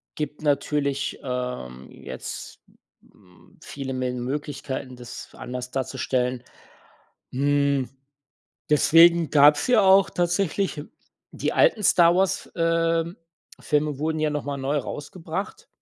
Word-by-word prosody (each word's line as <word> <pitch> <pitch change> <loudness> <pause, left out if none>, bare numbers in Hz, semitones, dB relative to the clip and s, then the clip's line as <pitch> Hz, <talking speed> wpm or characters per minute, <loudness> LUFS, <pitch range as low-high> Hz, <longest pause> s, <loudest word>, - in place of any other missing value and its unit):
gibt 150 0 -5
natürlich, 140 -1 -1
ähm, 125 - -5
jetzt, - - -8 0.5
hm, 90 -4 -23
viele 135 -2 -6
Mel 130 -1 -2
Möglichkeiten, 135 0 -5
das 120 -1 -9
f - - -16
anders 125 0 -6
darzustellen. 125 -1 -2 0.9
Hm, 140 0 +1 0.8
deswegen 165 +2 +5
gab's 145 0 +5
ja 245 -4 +4
auch 195 0 +6
tatsächlich 175 -2 -1 0.5
die - - -2
alten 215 - +3
Star 175 -3 +5
Wars, 190 0 0
ähm, 165 +1 0 0.4
Filme 150 -2 0
wurden 155 +1 -1
ja 155 -1 +1
noch 150 -1 -3
mal 140 0 -3
neu 140 +2 -1
rausgebracht. 165 +6 -6
145 Hz, 115 wpm, -24 LUFS, 130-165 Hz, 0.9 s, auch